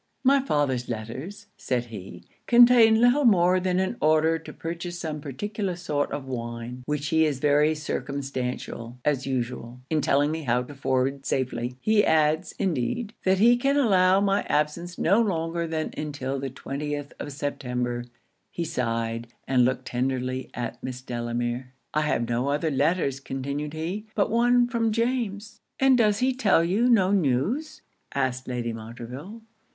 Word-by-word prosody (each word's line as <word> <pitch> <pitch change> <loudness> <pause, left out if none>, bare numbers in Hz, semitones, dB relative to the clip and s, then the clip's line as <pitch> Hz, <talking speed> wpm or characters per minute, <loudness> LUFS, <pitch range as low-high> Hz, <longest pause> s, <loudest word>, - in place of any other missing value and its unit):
'My 275 +1 +5
father's 145 - 0
letters,' 130 - -6
said 125 -2 -1
he, 105 -5 -9 0.2
'contain 235 -2 +7
little 245 +5 +4
more 185 -5 +5
than 180 0 0
an 190 +6 -1
order 155 +1 +3
to 160 - -10
purchase 170 +1 -5
some 155 -3 -4
particular 195 - -3
sort 150 -5 -2
of 145 -2 -4
wine 120 -1 -5
which 150 -1 -2
he 160 0 +4
is 150 -4 +1
very 150 +2 +3
circumstantial, 130 -5 -4
as 140 -2 +1
usual, 125 -1 -3
in 155 -1 +2
telling 145 +2 +2
me 160 0 -3
how 125 -3 +1
to 145 - -10
forward 135 0 -1
safely. 125 -1 -2
He 215 +6 +3
adds, 155 0 +2
indeed, 195 - -1
that 190 0 +4
he 235 +5 +5
can 275 +3 +1
allow 190 -7 +4
my 200 0 +2
absence 170 +4 -1
no 200 +7 +3
longer 170 -4 -1
than 160 -1 -2
until 140 -3 -3
the 135 0 -3
20th 145 +2 -5
of 145 - -5
September.' 125 -4 -3 0.4
He 170 - -4
sighed, 115 -4 -2 0.2
and 130 -2 +4
looked 130 +1 0
tenderly 130 +1 -2
at 120 0 -5
Miss 130 0 -5
Delamere. 120 +1 -3 0.2
'I 155 - +2
have 120 -6 0
no 120 +3 0
other 150 +2 0
letters,' 140 -1 +1
continued 140 +2 -4
he, 180 +7 -4
'but 210 0 +1
one 240 +1 +4
from 230 -2 0
James.' 230 -2 -2 0.2
'And 270 -1 +5
does 215 -4 +3
he 260 +1 +2
tell 205 -9 +3
you 205 +9 +2
no 195 -6 +4
news,' 200 - 0 0.3
asked 130 -2 -1
Lady 120 -2 -2
Montreville? 120 - -8
150 Hz, 155 wpm, -26 LUFS, 130-195 Hz, 0.4 s, contain